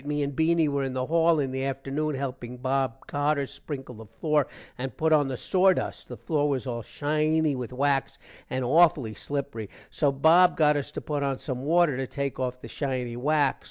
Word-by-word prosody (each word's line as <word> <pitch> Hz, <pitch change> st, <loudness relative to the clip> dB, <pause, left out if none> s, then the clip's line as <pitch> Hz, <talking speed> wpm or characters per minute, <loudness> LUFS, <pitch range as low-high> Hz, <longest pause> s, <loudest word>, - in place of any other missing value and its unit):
me 150 Hz, 0 st, -1 dB
and 140 Hz, -1 st, -3 dB
Beany 160 Hz, +1 st, +3 dB
were 140 Hz, -1 st, 0 dB
in 135 Hz, -1 st, -2 dB
the 130 Hz, 0 st, -1 dB
hall 165 Hz, +1 st, +3 dB
in 135 Hz, -2 st, -1 dB
the 130 Hz, 0 st, -2 dB
afternoon 135 Hz, +2 st, -2 dB
helping 125 Hz, -2 st, -5 dB
Bob 130 Hz, -1 st, -1 dB
Carter 145 Hz, 0 st, 0 dB
sprinkle 135 Hz, -2 st, -8 dB
the 110 Hz, -1 st, -11 dB
floor 150 Hz, +5 st, 0 dB, 0.3 s
and 130 Hz, -1 st, -6 dB
put 160 Hz, 0 st, +2 dB
on 145 Hz, -2 st, +4 dB
the 130 Hz, -2 st, -3 dB
sordust. 185 Hz, +4 st, +1 dB
the -, -, -8 dB
floor 150 Hz, -2 st, 0 dB
was 135 Hz, -2 st, -1 dB
all 120 Hz, -2 st, -3 dB
shiny 155 Hz, +4 st, 0 dB
with 125 Hz, -2 st, -5 dB
wax 135 Hz, +1 st, 0 dB, 0.3 s
and 130 Hz, -1 st, -2 dB
aufully 145 Hz, -5 st, +4 dB
slipery. 140 Hz, -7 st, -4 dB, 0.2 s
so 145 Hz, -3 st, +2 dB
Bob 165 Hz, +6 st, +5 dB
got 150 Hz, -1 st, +4 dB
us 145 Hz, 0 st, -3 dB
to -, -, -5 dB
put 145 Hz, -2 st, -3 dB
on 135 Hz, -1 st, 0 dB
some 130 Hz, -3 st, -5 dB
water 160 Hz, -1 st, +3 dB
to 135 Hz, -1 st, -2 dB
take 140 Hz, 0 st, -4 dB
off 125 Hz, 0 st, -3 dB
the -, -, -8 dB
shiny 130 Hz, -4 st, -3 dB
wax. 145 Hz, +2 st, +1 dB
140 Hz, 200 wpm, -27 LUFS, 130-155 Hz, 0.3 s, Bob